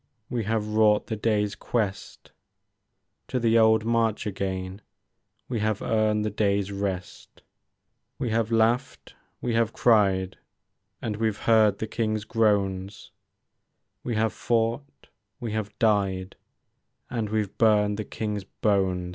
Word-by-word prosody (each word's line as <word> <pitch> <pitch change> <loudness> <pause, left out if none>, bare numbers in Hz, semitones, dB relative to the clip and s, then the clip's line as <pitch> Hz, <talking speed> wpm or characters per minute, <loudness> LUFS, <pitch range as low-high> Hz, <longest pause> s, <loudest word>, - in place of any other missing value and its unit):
We 120 -4 -1
have 110 0 0
wrought 105 -1 +3
the 110 - -3
day's 105 -1 0
quest; 105 -5 -4 1.0
To 130 - -1
the 115 -1 +3
old 110 0 +4
march 115 -1 +1
again 95 -1 -4 0.7
We 120 -3 -2
have 105 -1 -1
earned 110 -1 +1
the 105 - -1
day's 100 -1 0
rest; 95 -2 -5 0.7
We 120 - -2
have 115 0 0
laughed, 115 +4 0 0.3
we 120 - -1
have 115 -1 +1
cried, 95 -5 +2 0.6
And 105 -2 -2
we 110 0 +1
've 105 - -8
heard 110 -3 +4
the - - -3
King's 110 -1 -2
groans; 100 -3 0 0.9
We 120 - -2
have 110 0 +1
fought, 120 +4 -2 0.3
we 115 -2 -4
have 105 -1 -4
died, 100 -4 +1 0.8
And 115 -3 -2
we 110 0 +1
've 100 - -13
burned 105 -2 +3
the 110 - -3
King's 105 -1 -4
bones. 95 -3 0
110 Hz, 135 wpm, -26 LUFS, 100-115 Hz, 1.0 s, old